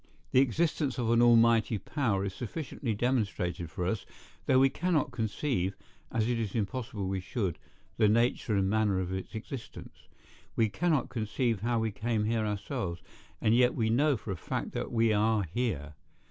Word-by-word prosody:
The - - +5
existence 145 +1 0
of 120 -2 0
an 115 0 +4
Almighty 115 -1 +5
power 105 -5 -1
is 95 - -3
sufficiently 125 - -4
demonstrated 100 -8 -1
to 90 0 -3
us, 95 +3 -1 0.4
though 130 - +5
we 135 +1 +6
cannot 165 +1 0
conceive, 110 -3 -1 0.4
as 110 -1 +1
it 120 -1 0
is 110 -4 -3
impossible 110 -2 -2
we 95 0 -1
should, 95 -1 -3 0.4
the 105 - +5
nature 115 0 +2
and 95 -1 +2
manner 105 -2 +2
of 95 0 -3
its 95 +4 -5
existence. 115 +2 -8 0.5
We 110 -2 +3
cannot 155 +1 +1
conceive 115 -2 -1
how 120 +1 +1
we 110 -1 0
came 110 +1 -1
here 110 -1 0
ourselves, 100 - -3 0.4
and 110 - +3
yet 125 0 +4
we 110 -2 +1
know 140 +3 +3
for 105 - -6
a - - -2
fact - - -4
that - - -4
we 115 -1 +3
are 105 0 +2
here. 80 - -2
110 Hz, 175 wpm, -30 LUFS, 100-125 Hz, 0.5 s, we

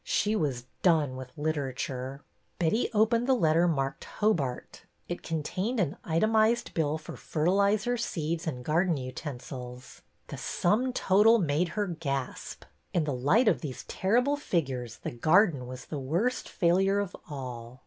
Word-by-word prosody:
She 210 +1 +1
was 135 - -1 0.2
done 155 -7 +3
with 130 +2 -9
Literature! 135 -3 -3 0.3
Betty 175 +8 +1
opened 230 +2 +2
the 265 - +4
letter 165 -4 +3
marked 135 -3 -1
Hobart." 155 -13 -1 0.3
It 175 - -4
contained 185 - -2
an 165 -7 0
itemized 220 +7 +2
bill 155 -2 0
for 155 - -9
fertilizer, 200 +8 +1
seeds, 170 -6 -2
and 125 -5 -4
garden 165 +1 +2
utensils. 125 -2 -7 0.3
The - - -6
sum 220 +8 +1
total 220 0 +5
made 165 -2 +1
her 205 - +2
gasp. 145 -7 -4 0.3
In 170 - +3
the 150 -2 -1
light 150 - +3
of 200 - +3
these 130 -5 -6
terrible 245 +9 +1
figures 130 - -2
the - - -5
garden 155 - +3
was 125 0 -8
the 150 - -5
worst 175 - -1
failure 190 +3 +2
of 200 -2 -2
all 125 -3 -7
160 Hz, 145 wpm, -29 LUFS, 135-205 Hz, 0.3 s, total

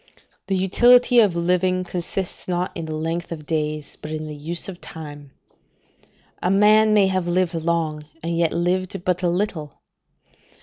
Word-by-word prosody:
The 195 - 0
utility 240 +6 +5
of 205 -6 +4
living 180 +1 +1
consists 180 +1 -5
not 180 0 -1
in 165 - -4
the 155 -1 -4
length 165 +2 -3
of 155 -3 -6
days, 150 -1 -3
but 150 - -7
in 155 0 -4
the 155 - -6
use 160 +4 -3
of 185 -3 -8
time; 145 -3 -9 1.1
a 180 - +1
man 210 +2 +5
may 210 -2 +5
have 185 -2 0
lived 180 0 +1
long, 165 -2 -1 0.2
and 170 0 -2
yet 165 -1 +2
lived 185 +1 -1
but 180 0 0
a 175 - +1
little. 170 -5 -3
175 Hz, 165 wpm, -22 LUFS, 160-185 Hz, 1.1 s, utility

